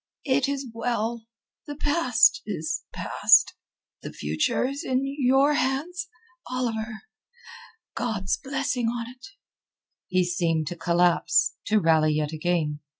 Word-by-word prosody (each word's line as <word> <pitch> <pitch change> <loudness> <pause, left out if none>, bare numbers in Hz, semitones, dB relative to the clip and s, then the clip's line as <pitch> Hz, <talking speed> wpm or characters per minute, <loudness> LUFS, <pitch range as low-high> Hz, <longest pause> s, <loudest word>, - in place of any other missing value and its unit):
"It 270 -1 +2
is 280 -1 -3
well. 230 -1 -2 0.4
The 290 - -6
past 285 -6 +3
is 160 -7 -3
past. - - +4 0.5
The - - -7
future 75 - -1
is 275 +4 -4
in 260 -3 0
your 275 +1 +2
hands, 310 +7 -1 0.4
Oliver. 230 -3 -3 0.9
God's 195 -5 -1
blessing 270 -3 -2
on't." 240 +5 -6 0.8
He 185 -1 +1
seemed 170 -3 0
to 175 - -5
collapse, 170 +1 +2
to 215 0 +3
rally 160 -3 +3
yet 150 0 -2
again. 155 -2 -1
230 Hz, 115 wpm, -25 LUFS, 175-270 Hz, 0.9 s, past